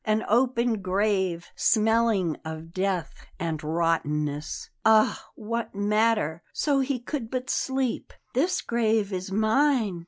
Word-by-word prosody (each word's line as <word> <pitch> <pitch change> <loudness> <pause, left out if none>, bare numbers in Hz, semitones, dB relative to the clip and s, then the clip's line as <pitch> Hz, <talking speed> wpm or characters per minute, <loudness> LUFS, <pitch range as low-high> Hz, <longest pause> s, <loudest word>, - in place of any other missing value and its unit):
An 215 +1 0
open 235 -1 +2
grave, 190 -2 0
smelling 220 -6 +2
of 160 +1 -7
death 185 -3 -1 0.3
and 160 -2 -3
rottenness 150 -2 -1
Ah, 220 -1 +4
what 230 0 -4
matter, 210 -5 +1
so 285 -2 +1
he 265 -1 0
could 240 -1 -5
but 255 +1 -3
sleep! 265 -3 -1 0.2
"This 315 +9 +1
grave 220 -3 0
is 185 +1 -4
mine!" 220 -2 +2
215 Hz, 120 wpm, -26 LUFS, 175-235 Hz, 0.3 s, Ah